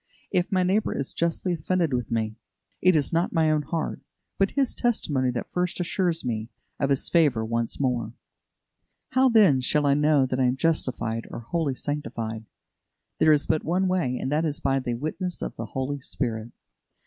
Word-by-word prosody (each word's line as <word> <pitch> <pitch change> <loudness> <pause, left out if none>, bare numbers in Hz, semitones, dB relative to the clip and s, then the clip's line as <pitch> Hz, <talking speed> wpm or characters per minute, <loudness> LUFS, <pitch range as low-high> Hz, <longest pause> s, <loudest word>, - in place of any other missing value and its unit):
If 180 +2 +1
my 185 -1 +3
neighbour 195 +4 +1
is 140 - -3
justly 170 +2 0
offended 170 -1 0
with 125 -2 -2
me, 110 -1 -1 0.5
it 185 -1 +5
is 145 -1 +1
not 170 +2 +1
my 160 -2 +3
own 155 -1 +2
heart, 160 +2 -3 0.4
but 195 0 +3
his 270 -3 +2
testimony 145 - +1
that 120 -1 -4
first 180 0 -1
assures 175 -2 0
me 110 -2 -2 0.3
of 140 - +1
his 135 -1 +1
favour 145 -10 +3
once 115 0 -2
more. 120 -5 -1 1.0
How, 260 0 +4
then, 200 - +5
shall 145 +3 +2
I 140 - +4
know 150 -1 +3
that 130 0 -2
I 130 - +3
am 125 +1 +1
justified 120 -8 0
or - - -7
wholly 145 +2 -1
sanctified? 115 -6 -4 0.7
There 155 - +5
is 150 -1 +3
but 155 - +1
one 185 +4 +1
way, 175 -9 0
and 130 - -3
that 155 +2 +2
is 155 -2 -1
by 135 0 +1
the 120 -2 -2
witness 160 +7 -4
of - - -5
the - - -5
Holy 140 +1 -3
Spirit. 115 -3 -3
145 Hz, 185 wpm, -26 LUFS, 125-170 Hz, 1.0 s, it